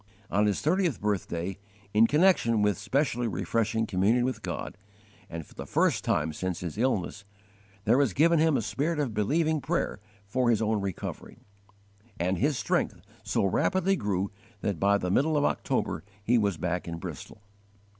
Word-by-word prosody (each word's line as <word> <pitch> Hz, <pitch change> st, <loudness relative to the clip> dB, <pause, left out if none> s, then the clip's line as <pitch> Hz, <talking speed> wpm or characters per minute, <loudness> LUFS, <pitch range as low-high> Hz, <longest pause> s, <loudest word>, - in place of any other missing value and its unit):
On 105 Hz, +1 st, +3 dB
his 100 Hz, -, 0 dB
thirtieth 170 Hz, -, +1 dB
birthday, 95 Hz, -2 st, -2 dB, 0.3 s
in 110 Hz, +2 st, +6 dB
connection 145 Hz, -, +3 dB
with 105 Hz, -1 st, +3 dB
specially 120 Hz, +2 st, 0 dB
refreshing 110 Hz, +2 st, 0 dB
communion 105 Hz, +5 st, +2 dB
with 130 Hz, -4 st, -2 dB
God, -, -, -5 dB, 0.5 s
and 85 Hz, -1 st, -6 dB
for -, -, -19 dB
the -, -, -8 dB
first -, -, +2 dB
time 75 Hz, +1 st, 0 dB
since 90 Hz, +2 st, -3 dB
his 85 Hz, -3 st, -4 dB
illness, 105 Hz, -4 st, -1 dB, 0.6 s
there 120 Hz, +5 st, +4 dB
was 140 Hz, -6 st, +3 dB
given 165 Hz, -, +4 dB
him 160 Hz, -2 st, +4 dB
a -, -, -1 dB
spirit 145 Hz, +9 st, -1 dB
of 140 Hz, -7 st, -1 dB
believing 155 Hz, +9 st, +1 dB
prayer 165 Hz, -7 st, -1 dB, 0.3 s
for 120 Hz, +4 st, +1 dB
his 115 Hz, -3 st, +3 dB
own 110 Hz, -1 st, +1 dB
recovery; 95 Hz, -4 st, -5 dB, 0.8 s
and 90 Hz, +1 st, 0 dB
his 145 Hz, +2 st, +1 dB
strength 105 Hz, -, 0 dB, 0.2 s
so -, -, 0 dB
rapidly 190 Hz, -, +2 dB
grew 100 Hz, -, -1 dB, 0.3 s
that 100 Hz, -6 st, -2 dB
by 100 Hz, +1 st, +4 dB
the 90 Hz, -2 st, -2 dB
middle 150 Hz, +8 st, +2 dB
of 145 Hz, -, +2 dB
October 80 Hz, -, -1 dB, 0.2 s
he 115 Hz, +4 st, +3 dB
was 100 Hz, -6 st, +2 dB
back 90 Hz, +2 st, -2 dB
in 85 Hz, 0 st, -4 dB
Bristol. 100 Hz, +4 st, -8 dB
110 Hz, 165 wpm, -28 LUFS, 95-140 Hz, 0.8 s, in